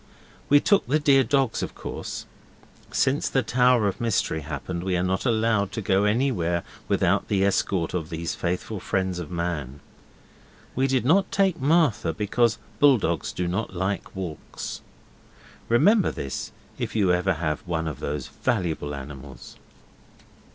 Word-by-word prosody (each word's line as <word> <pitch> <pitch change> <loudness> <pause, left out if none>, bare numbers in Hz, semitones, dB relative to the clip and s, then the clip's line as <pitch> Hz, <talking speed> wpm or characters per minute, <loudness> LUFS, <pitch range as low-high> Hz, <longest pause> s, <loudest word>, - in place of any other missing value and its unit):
We 145 - +7
took 200 - +2
the 140 +5 +3
dear 140 -3 +4
dogs 135 -3 +1
of - - -5
course. - - -6 0.7
Since 135 +3 +1
the 135 - +1
Tower 125 -2 +3
of 100 - -3
Mystery 110 -8 0
happened 80 +4 -5
we 90 -1 0
are 90 - 0
not 95 +6 0
allowed 110 -4 +2
to 110 - -3
go 95 +1 +2
anywhere 105 -7 +1 0.2
without - - +2
the 100 -1 +2
escort 95 -3 0
of 85 -3 -3
these 85 0 -3
faithful 90 +4 -3
friends 95 -1 -1
of 85 - -6
man. 85 -6 -3 1.0
We 130 +2 +2
did 130 -2 +1
not 190 +8 +3
take 190 -6 +1
Martha, 140 - +2
because 110 +4 +1 0.2
bull 140 -3 +6
dogs 85 -6 -1
do 90 - -2
not 95 +2 -3
like 95 +3 -2
walks. 90 -5 -6 0.9
Remember 195 - +4
this 70 -1 -5 0.3
if - - -3
you 95 -5 +3
ever 90 +2 +2
have 75 -2 -2
one 80 -2 -1
of 75 -5 -5
those 70 -3 -3
valuable 85 - -2
animals. 65 -2 -10
95 Hz, 150 wpm, -25 LUFS, 85-125 Hz, 1.0 s, We